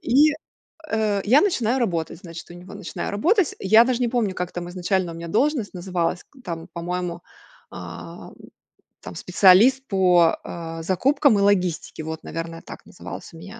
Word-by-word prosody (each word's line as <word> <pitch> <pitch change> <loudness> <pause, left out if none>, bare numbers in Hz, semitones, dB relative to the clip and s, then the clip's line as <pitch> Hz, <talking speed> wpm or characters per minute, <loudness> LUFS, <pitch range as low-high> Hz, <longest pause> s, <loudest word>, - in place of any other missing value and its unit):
и, 295 +5 +4 0.6
э, 210 -3 0
я 255 +8 +5
начинаю 260 - +1
работать 170 -8 -2
значит 170 -1 -10
у 175 - -10
него 180 +3 -11
начинаю 205 -3 -5
работать 340 - +2
я 220 +4 +6
даже 250 -1 -1
не 245 - +1
помню 225 -6 -1
как 180 0 -4
там 175 0 -5
изначально 180 -1 -1
у - - -10
меня 170 0 -7
должность 250 - 0
называлась 180 -1 -2
к 280 - -22
там 165 -3 -6
по-моему, 175 0 -4 0.5
ам, 85 -1 -9 0.7
там 85 - -9
специалист 205 - +4
по, 180 -4 +4
а, 165 -1 -7
закупкам 260 - +3
и - - +2
логистике, 180 -5 0
вот 160 0 -6
наверное 165 0 -6
так - - -11
называлась - - -10
у - - -11
меня 205 +7 -11
185 Hz, 170 wpm, -23 LUFS, 170-230 Hz, 0.7 s, я